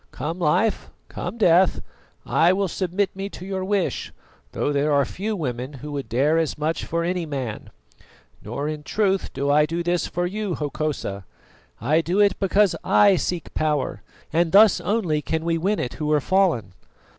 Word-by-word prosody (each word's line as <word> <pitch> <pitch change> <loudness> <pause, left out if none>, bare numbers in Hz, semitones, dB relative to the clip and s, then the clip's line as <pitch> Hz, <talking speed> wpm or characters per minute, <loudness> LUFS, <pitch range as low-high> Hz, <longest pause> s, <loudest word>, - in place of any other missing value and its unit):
Come 165 +4 -5
life, 180 +7 +1 0.2
come 185 +6 -5
death, 180 -3 +4 0.5
I 170 +3 +3
will 195 +1 0
submit 185 +2 -1
me 195 +1 -4
to 185 - -9
your 190 -1 -3
wish, 195 -1 -1 0.4
though 145 - -1
there 145 +2 +1
are 140 -1 +3
few 210 - -4
women 130 -5 -4
who 145 +2 -8
would 140 -2 -5
dare 145 +7 +2
as 160 -3 -1
much 155 +2 -2
for 170 +1 -1
any 175 -1 -2
man. 130 -7 -5 0.7
Nor 145 - -4
in 155 -1 -4
truth 195 +4 0
do 140 +1 -1
I 150 +1 +4
do 170 +2 -2
this 175 -1 0
for 175 +1 -2
you, 200 -1 -3
Hokosa; 145 -9 -3 0.6
I 150 +8 +2
do 175 +4 -1
it 205 -2 +3
because 195 0 +3
I 200 -2 +5
seek 175 -1 -3
power, 150 -3 -1 0.3
and 165 0 +2
thus 205 -2 +6
only 175 -5 0
can 160 +2 -2
we 165 -1 +1
win 200 +5 0
it 125 - -3
who 150 0 -2
are 150 - +4
fallen. 155 - +1
165 Hz, 180 wpm, -23 LUFS, 150-190 Hz, 0.7 s, thus